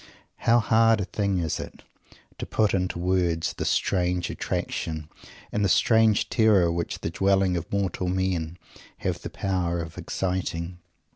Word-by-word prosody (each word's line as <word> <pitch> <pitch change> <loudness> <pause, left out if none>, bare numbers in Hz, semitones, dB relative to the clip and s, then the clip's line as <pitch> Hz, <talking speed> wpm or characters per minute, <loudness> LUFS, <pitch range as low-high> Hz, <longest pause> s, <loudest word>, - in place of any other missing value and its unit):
How 115 - +3
hard 115 0 +4
a 100 - -1
thing 100 +1 -1
is 80 -4 -1
it, - - -9 0.6
to - - -5
put 110 -2 +1
into 90 -2 0
words 85 -2 0
the - - -4
strange 90 -1 0
attraction 80 -1 -3 0.4
and 105 - 0
the 100 - +2
strange 110 +1 +4
terror 105 -7 +4
which 85 0 -3
the 80 - -3
dwellings 95 -1 +2
of 80 - -12
mortal 95 -2 -1
men 90 -3 -1 0.4
have - - -3
the - - -6
power 90 -3 -1
of 80 -1 -6
exciting! 90 -2 -3
90 Hz, 150 wpm, -26 LUFS, 85-100 Hz, 0.6 s, hard